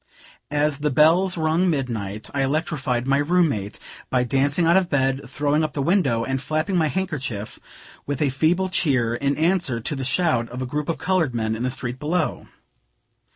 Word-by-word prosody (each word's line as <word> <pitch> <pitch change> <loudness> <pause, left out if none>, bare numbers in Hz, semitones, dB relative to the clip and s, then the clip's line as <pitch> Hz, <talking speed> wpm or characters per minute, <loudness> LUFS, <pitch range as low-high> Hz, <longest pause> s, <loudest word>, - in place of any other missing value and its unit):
As 150 -1 0
the 150 0 0
bells 165 +6 +4
rung 160 +3 +2
midnight, 110 - -3
I 140 - 0
electrified 135 -4 -1
my 135 +1 +2
room 170 +3 +3
mate 105 -6 -4 0.3
by 125 -1 +2
dancing 140 +6 +1
out 170 +2 +4
of 190 -2 +2
bed, 135 -1 +1
throwing 145 +3 0
up 155 - -2
the 140 - -2
window, 140 - +2
and 130 +1 -2
flapping 155 +7 -1
my 165 -3 +3
handkerchief, 140 - -4 0.5
with 145 -1 -2
a 145 - +2
feeble 165 +8 +1
cheer, 130 -10 +1
in 140 +3 -1
answer 165 -7 +1
to 130 +6 -3
the 135 - -4
shout 135 -4 +1
of 125 - -7
a 130 - -2
group 150 +5 -3
of 165 - -1
colored 175 -9 0
men 110 -1 -1
in 110 - -6
the 125 - 0
street 125 -1 -4
below. 160 +1 -1
145 Hz, 190 wpm, -23 LUFS, 125-165 Hz, 0.5 s, bells